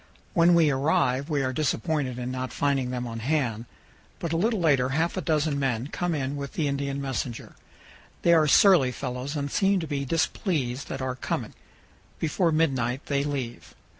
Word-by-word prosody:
When 170 +1 +5
we 160 -3 +4
arrive 135 0 +1
we 145 -3 +1
are 130 0 -1
disappointed 140 -1 -1
in 125 0 -4
not 130 0 -4
finding 135 -3 0
them 125 -1 -3
on 115 -1 -5
hand, 120 -4 -1 0.5
but 165 -1 -3
a - - +1
little 215 +5 +1
later 140 -7 +3
half 160 +5 0
a 185 - -2
dozen 150 -2 0
men 130 -1 -1
come 175 0 -1
in 135 -1 -2
with 140 -1 -6
the 155 - 0
Indian 140 0 -2
messenger. 130 -3 -4 0.7
They 170 - +5
are 160 -2 +5
surly 155 -5 +6
fellows 125 +3 -5
and 140 -1 -3
seem 195 -1 +2
to 165 - -3
be 145 -2 -2
displeased 140 - -1
at 135 -1 -4
our 130 -1 -1
coming. 125 - -4 0.6
Before 165 +2 +1
midnight 135 -5 0
they 140 -1 0
leave. 135 -5 -5
140 Hz, 180 wpm, -26 LUFS, 130-160 Hz, 0.7 s, surly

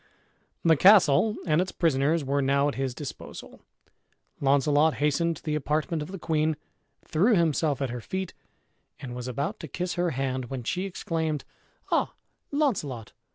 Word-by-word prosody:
The 165 -1 +5
castle 195 +3 +6
and 160 0 +3
its 185 - -2
prisoners 155 -1 +1
were 140 +1 +1
now 140 +1 +2
at 145 - -1
his 130 -2 -3
disposal. 145 -3 -8 0.8
Launcelot 145 +3 +3
hastened 160 +3 +1
to - - -16
the 155 - -2
apartment 150 +2 -1
of 150 - -5
the 195 - -5
queen, 155 -2 0 0.5
threw 205 +9 +3
himself 155 -4 +1
at 130 - -2
her 120 0 -5
feet, 190 +8 -4 0.7
and 125 -2 -7
was 125 0 -5
about 140 +5 -3
to 160 - -7
kiss 180 +5 -3
her 175 0 0
hand, 130 -2 -2
when 125 0 -5
she 180 +10 -2
exclaimed, 160 -5 -2 0.5
"Ah, - - +1 0.3
Launcelot! 160 - -1
150 Hz, 155 wpm, -27 LUFS, 135-170 Hz, 0.8 s, castle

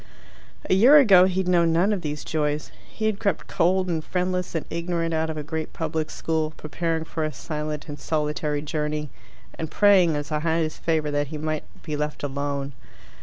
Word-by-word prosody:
A - - +3
year 245 +10 +8
ago 195 -10 +7
he 190 0 0
had 185 - -4
known 170 -2 +4
none 185 +6 +3
of 195 - -2
these 150 -2 -4
joys. 150 -1 -2 0.2
He 220 - -4
had 215 -2 0
crept 200 -6 -1
cold 185 +2 +1
and 165 -3 -1
friendless 180 0 -2
and 160 - -2
ignorant 170 -1 -1
out 160 0 0
of 155 - -4
a 150 - -3
great 160 +1 -4
public 160 -1 -2
school, 160 -1 -2
preparing 165 +1 -2
for 160 0 -3
a 155 - -1
silent 150 -1 -5
and 145 -2 -7
solitary 150 0 -1
journey, 150 -1 -3 0.5
and 160 -1 -3
praying 190 -5 +5
as 145 +1 -4
a 150 - +1
highest 160 0 -1
favour 155 -2 0
that 145 0 0
he 155 +2 -6
might 155 0 -3 0.2
be 155 -2 -3
left 150 0 -3
alone. 140 0 -3
160 Hz, 195 wpm, -24 LUFS, 150-175 Hz, 0.5 s, year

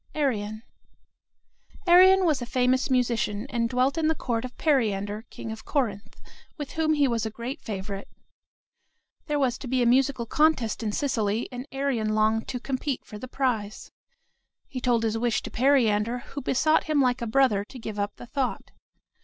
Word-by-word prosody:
ARION 215 -7 -1 1.2
Arion 370 +2 +7
was 305 -6 +2
a 240 - -4
famous 255 +2 +1
musician, 235 -4 0
and 230 -2 0
dwelt 255 +5 +1
in 315 - +1
the 320 - +2
court 235 -5 -2
of 250 -1 -8
Periander, 215 -7 0
king 225 - -7
of 220 0 -8
Corinth, 220 -9 -2 0.4
with 290 -3 -6
whom 315 -1 +1
he 290 -2 +3
was 235 -3 -1
a 220 - -1
great 240 +7 -6
favorite. 200 -1 -5 1.2
There 295 -1 0
was 265 -3 0
to 265 - -7
be 255 0 +1
a - - +2
musical 255 0 +2
contest 280 -4 +1
in 215 -2 -1
Sicily, 220 -4 -1
and 250 +2 -7
Arion 255 -6 -1
longed 220 +1 +2
to 250 - -4
compete 270 +1 -3
for 210 - -9
the 255 - -7
prize. 240 -6 -2 0.8
He 255 - -6
told 240 -2 +2
his 225 0 0
wish 240 -1 0
to - - -7
Periander, 240 -3 +2
who 285 - -4
besought 310 +5 +2
him 310 -2 +1
like 250 -2 +2
a 235 - -2
brother 220 -4 +3
to 260 - -12
give 220 -3 -6
up 205 0 -2
the - - -10
thought. 265 +1 -3
245 Hz, 180 wpm, -26 LUFS, 220-275 Hz, 1.2 s, Arion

